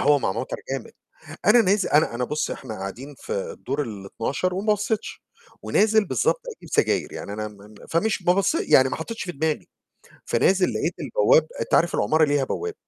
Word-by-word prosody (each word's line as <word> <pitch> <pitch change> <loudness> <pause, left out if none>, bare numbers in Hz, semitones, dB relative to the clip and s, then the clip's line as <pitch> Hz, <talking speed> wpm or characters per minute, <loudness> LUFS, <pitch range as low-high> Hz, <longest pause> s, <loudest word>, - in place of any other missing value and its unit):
هوا 145 +1 +4
مع 95 - -1
مطر 115 +5 -4
جامد. 135 -3 -4 0.5
أنا 225 +5 +7
ناز 200 -1 +2
أنا 150 -5 +2
أنا 125 - -1
بُص 150 +5 -2
إحنا 125 -5 -6
قاعدين 125 +10 -7
في - - -10
الدور 130 +8 -3
ال12 115 - -3
وما 210 +3 +2
بصيتش، 210 +1 -3 0.4
ونازل 215 0 +3
بالضبط - - +1 0.2
أجيب - - -14
سجاير - - +1
يعني، 100 - -6
أنا 110 +1 -4
م 105 - -12
م 105 +1 -15
فمش 200 +5 0
ما 175 0 +3
بصي 250 - +1
يعني 130 0 +6
ما - - -3
حطيتش 225 +9 -5
في 180 - -5
دماغي. 155 +1 -2 0.6
فنازل 190 -1 +3
لقيت - - -1
البواب - - +3
أنت 475 +1 -4
عارف 170 - +3
العمارة 155 0 +3
ليها 145 -1 +1
بواب، 435 - -3
160 Hz, 185 wpm, -24 LUFS, 130-210 Hz, 0.6 s, أنا